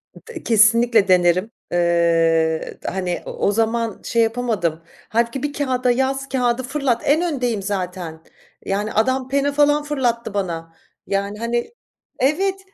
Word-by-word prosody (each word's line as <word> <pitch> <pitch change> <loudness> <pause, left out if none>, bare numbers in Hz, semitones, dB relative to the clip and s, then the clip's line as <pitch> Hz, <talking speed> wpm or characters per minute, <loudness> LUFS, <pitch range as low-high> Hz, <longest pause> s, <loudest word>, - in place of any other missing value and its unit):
D 470 - -10
kesinlikle 225 -1 +4
denerim. 180 0 +4 0.3
Iıı, 165 -2 +2 0.2
d - - -7
hani, 180 -2 -2
o - - -6
o 200 - 0
zaman 225 0 -1
şey 230 0 +1
yapamadım. 225 -9 -1 0.3
Hâlbuki 235 +4 0
bir 290 0 -2
kâğıda 255 -3 0
yaz, 270 +2 -1
kâğıdı 250 -1 0
fırlat. 275 -2 -1
En 305 +4 +3
öndeyim 250 - -1
zaten. 180 -4 -4 0.4
Yani, 205 +2 -2
adam 260 +3 +1
pena 280 +1 +1
falan, 290 +1 +3
fırlattı 245 -7 -1
bana. 165 -4 -4 0.3
Yani, 200 +1 -2
hani, 235 - -2 0.5
evet. 380 +8 +1
230 Hz, 135 wpm, -21 LUFS, 185-265 Hz, 0.5 s, kesinlikle